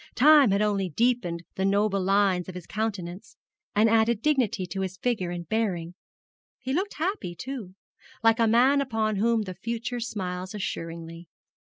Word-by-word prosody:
Time 290 -1 +7
had 200 +2 +2
only 200 -3 0
deepened 185 -4 0
the 190 - -2
noble 200 0 +2
lines 190 -2 +2
of 185 - -8
his 180 -2 -7
countenance, 205 -2 -4 0.4
and 215 +2 +5
added 225 0 +3
dignity 240 -9 +1
to 180 +2 -4
his 190 0 -4
figure 215 -5 -1
and 175 -1 -5
bearing. 180 -6 -1 0.6
He 260 0 -4
looked 385 +6 -1
happy, 330 - -2
too, 235 -5 -7 0.5
like 225 +1 +4
a 230 - +4
man 255 +5 +4
upon 220 -5 -1
whom 225 +1 +2
the 185 -2 -6
future 235 +5 -4
smiles 185 -4 -4
assuringly. 165 -3 -6
210 Hz, 160 wpm, -26 LUFS, 185-235 Hz, 0.6 s, Time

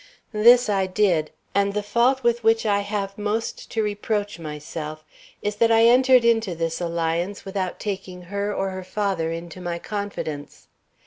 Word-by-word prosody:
"This 240 +3 +6
I 195 -2 +1
did, 185 -5 +1 0.2
and 200 0 +1
the 210 - 0
fault 245 +5 +2
with 235 0 +1
which 225 0 +3
I 205 -1 +3
have 200 -1 -3
most 210 +2 -3
to 220 - -1
reproach 205 -2 -2
myself 155 0 -7 0.4
is 205 0 -2
that 230 +1 +4
I 225 0 +5
entered 250 0 +6
into 225 -6 +2
this 165 +1 -2
alliance 170 +3 -2
without 190 -2 -3
taking 190 -3 -5
her 200 +3 -3
or 195 -1 -2
her 185 0 -6
father 185 -4 -1
into 170 +2 -7
my 175 -1 -3
confidence. 170 -7 -5
200 Hz, 165 wpm, -23 LUFS, 175-215 Hz, 0.4 s, This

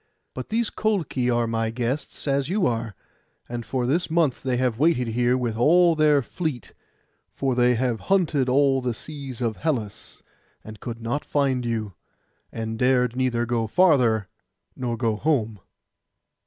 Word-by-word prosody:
But 130 - -7
these 225 +1 0
Colchi 170 - -1
are 120 -1 +2
my 115 0 -1
guests, 125 +6 -3
as 140 0 0
you 195 0 +1
are; 115 - -2 0.5
and 120 0 -5
for 125 +2 -2
this 165 +8 0
month 160 -5 +1
they 130 -2 -1
have 125 -2 0
waited 140 -6 +2
here 120 +2 +1
with 120 -3 -2
all 170 +8 +4
their 150 -3 +3
fleet, 150 - -5 0.6
for 135 -2 0
they 125 0 +3
have 120 -1 -1
hunted 160 -9 +2
all 135 0 +3
the 125 -2 -2
seas 135 -3 -8
of 115 -3 -1
Hellas, 125 -10 -4 0.4
and 110 -1 -10
could 115 -1 -7
not 120 +6 -2
find 130 -4 0
you, 110 -4 -3 0.6
and 110 0 -5
dared 125 -1 +2
neither 125 -2 0
go 115 -1 -1
farther, 120 - +3 0.5
nor 120 -2 -3
go 115 -2 0
home. 115 -6 0
125 Hz, 155 wpm, -24 LUFS, 115-145 Hz, 0.6 s, all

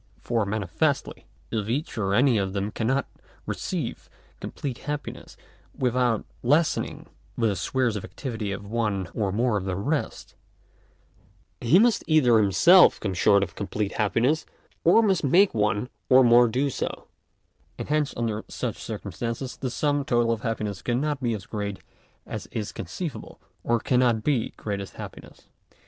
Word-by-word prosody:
For 115 -4 -1
manifestly, 100 -4 -1 0.2
if 110 -2 -2
each 140 +7 -2
or 100 -4 0
any 125 -2 +4
of 95 -1 -2
them 100 +1 -2
cannot 130 +5 0 0.4
receive - - -4 0.3
complete 130 -4 -5
happiness 150 0 -6 0.4
without 125 -3 +1 0.2
lessening 150 +6 +1 0.3
the 110 -4 +1
spheres 120 +4 0
of 105 - -4
activity 110 -7 -5
of 100 +1 -5
one 105 -5 -1
or 100 -4 -1
more 115 +2 +1
of 95 - -4
the 95 -1 -2
rest, 140 - -3 1.3
he 125 +9 +5
must 230 +2 +4
either 130 -8 +5
himself 170 - +6
come 95 -3 -2
short 100 +2 +4
of 90 -2 -5
complete 105 0 -3
happiness, 120 +9 +1 0.4
or 185 +7 +6
must 195 -6 +2
make 185 +8 +4
one 105 +1 0 0.2
or 130 0 +7
more 120 0 +6
do 135 +5 0
so; - - -4 0.7
and - - -6
hence 150 -1 +1
under 110 -2 -2
such - - -4
circumstances, 120 +2 -5
the 130 - -4
sum 145 +3 0
total 120 -4 +2
of 115 -2 -2
happiness 110 -4 -3
cannot 140 +4 -1
be 120 -3 0
as 100 -3 -8
great 100 -2 -4 0.5
as - - -6
is 105 -3 -4
conceivable, 155 - -6 0.2
or 120 0 +1
cannot 120 -3 +2
be 135 -7 +1
greatest 100 -2 -5
happiness. - - -10
115 Hz, 150 wpm, -25 LUFS, 105-135 Hz, 1.3 s, or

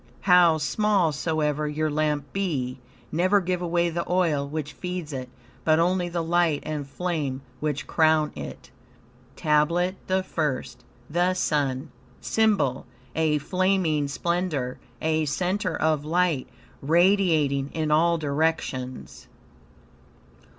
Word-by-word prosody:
"How 180 -3 +6
small 195 +2 +2
soever 150 0 -1
your 155 +1 -1
lamp 150 -2 -1
be, 135 -10 -2 0.3
never 185 +5 +3
give 180 -1 -2
away 170 0 +1
the 170 +1 -2
oil 160 -6 +1
which 150 0 -4
feeds 180 -4 -5
it, 130 -1 -5 0.3
but 155 -1 +4
only 175 +1 +1
the 170 -1 -2
light 165 -2 +1
and 150 -2 -4
flame, 145 -4 -3 0.2
which 150 -2 -2
crown 155 -2 +3
it." - - -8 0.6
TABLET 170 +5 +1
THE 190 0 +1
FIRST 135 -7 -3 0.2
The 175 +4 +1
Sun 145 -4 -1 0.3
SYMBOL 205 - +1 0.3
A 155 -2 +2
flaming 180 -2 +1
splendor, 155 -4 -2 0.2
a 160 0 +1
center 180 +4 -1
of 155 -2 +1
light, 165 -3 +1 0.3
radiating 160 -4 +3
in 155 -1 -2
all 170 +2 +4
directions. 140 -4 -2
160 Hz, 115 wpm, -25 LUFS, 145-180 Hz, 0.6 s, How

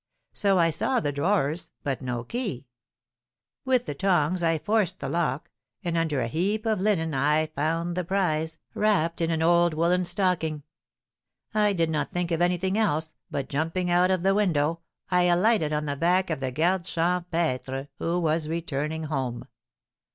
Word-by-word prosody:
So 200 -2 +2
I 165 -1 +4
saw 245 - +1
the 145 - -1
drawers, 160 +1 0
but 140 -3 -2
no 125 -2 -3
key. 200 - -4 1.0
With 255 -2 +2
the 145 - -3
tongs 180 +1 +1
I 165 -1 +2
forced 195 0 0
the - - -4
lock, 155 -5 -1 0.3
and 170 -2 -1
under 160 -5 0
a 115 - -1
heap 200 - -1
of 215 -4 +1
linen 170 -6 +1
I 150 +3 +2
found 165 +3 -2
the 180 - -1
prize, 160 -3 -1 0.2
wrapped 170 -6 +1
in 165 - +1
an 160 -1 0
old 170 -1 +4
woollen 175 +3 +2
stocking. 175 -5 0 0.9
I 210 -1 +3
did 165 -3 0
not 150 -1 -1
think 175 -1 -2
of 165 - +1
taking 175 - +4
anything 185 +3 0
else, 160 -7 0 0.2
but 140 -2 -3
jumping 165 +5 -1
out 180 +1 +4
of 185 -2 +1
the 195 0 +4
window, 165 -6 +1 0.3
I 180 0 +4
alighted 175 -2 +3
on 150 0 -1
the 145 -1 -2
back 175 +4 +2
of 155 - -1
the 130 -1 -2
garde 175 +6 +1
champêtre, 165 -7 -1
who 170 +2 0
was 160 -2 0
returning 160 -1 -3
home." 135 -6 -3
170 Hz, 175 wpm, -26 LUFS, 155-180 Hz, 1.0 s, I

